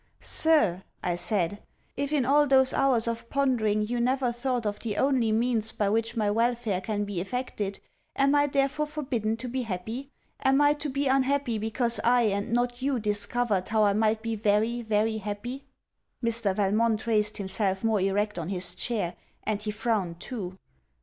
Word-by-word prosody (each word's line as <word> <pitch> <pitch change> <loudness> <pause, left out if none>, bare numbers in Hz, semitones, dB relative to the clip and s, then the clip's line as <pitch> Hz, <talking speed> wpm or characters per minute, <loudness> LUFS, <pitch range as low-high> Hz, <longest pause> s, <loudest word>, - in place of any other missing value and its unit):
'Sir,' 295 - +3 0.2
I 175 -1 0
said, 200 +1 0 0.3
'if 280 +1 -2
in 285 -5 +2
all 290 +3 +4
those 265 -1 +4
hours 245 -4 +2
of 230 0 -4
pondering 230 -7 +1
you 240 +2 -2
never 255 0 +1
thought 240 -1 -2
of 205 0 -2
the 210 -3 -4
only 260 -5 +2
means 225 -1 +1
by 215 -3 0
which 225 +3 0
my 210 -2 +1
welfare 230 -3 0
can 205 +1 -2
be 200 -4 -3
effected, 205 -2 -3 0.4
am 275 +1 +3
I 290 0 +4
therefore 275 +2 0
forbidden 255 -8 -2
to 250 +2 -6
be 255 +2 -2
happy? 225 +5 -5 0.3
Am 270 +1 +4
I 290 0 +5
to 295 0 -4
be 280 +1 -1
unhappy, 270 -3 +1
because 230 +2 0
I 245 0 +4
and 200 +1 -1
not 245 +1 0
you 270 -1 0
discovered 210 -1 0
how 220 0 +3
I 205 -1 +4
might 220 +1 +1
be 230 -1 -2
very, 220 +3 +1
very 220 0 0
happy?' 215 +6 -5 0.6
Mr. 230 -4 0
Valmont 215 +3 +1
raised 215 -2 +1
himself 190 0 -1
more 220 -3 +2
erect 205 +1 0
on 165 +1 -4
his 180 -2 -3
chair; 190 -2 -2 0.3
and 210 -1 -2
he 210 - -4
frowned 210 -6 -1
too. 190 -4 -6
225 Hz, 175 wpm, -27 LUFS, 205-255 Hz, 0.6 s, I